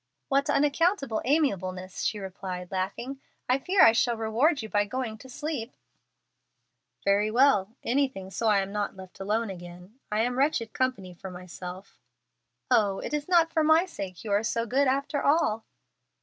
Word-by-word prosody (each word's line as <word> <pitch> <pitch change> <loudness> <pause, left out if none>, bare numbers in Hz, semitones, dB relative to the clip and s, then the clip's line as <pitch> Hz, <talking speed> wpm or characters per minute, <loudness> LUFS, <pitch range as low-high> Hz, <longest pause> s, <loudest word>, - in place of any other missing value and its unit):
"What 275 +1 +2
unaccountable 290 - +2
amiableness!" 185 - 0
she 215 - 0
replied, 185 -2 -6
laughing. 220 +9 -3 0.3
"I 255 +2 +2
fear 375 +7 +4
I - - +9
shall 235 +1 +1
reward 235 +6 +1
you - - -5
by 205 -1 +2
going 220 0 -4
to 260 - -13
sleep." 265 -3 -5 1.3
"Very 200 +2 +3
well, 225 -4 +3
anything 250 -7 -1
so 225 - -1
I 205 -2 +4
am 195 0 -5
not 205 -1 -2
left 185 -1 -12
alone 210 +2 -1
again. 180 +5 -11
I 210 +1 +2
am 245 +2 0
wretched 265 -6 +1
company 250 -9 -1
for 190 +2 -9
myself." 180 +1 -9 0.7
"Oh, 200 -3 +3
it - - -5
is 295 -1 -2
not 335 -2 +4
for 320 - +3
my 315 +3 +5
sake 195 - -7
you 215 - -5
are 200 +1 +3
so 230 +1 -1
good, 270 +5 +2
after 280 +2 0
all!" 280 -8 +2
225 Hz, 165 wpm, -27 LUFS, 195-275 Hz, 1.3 s, I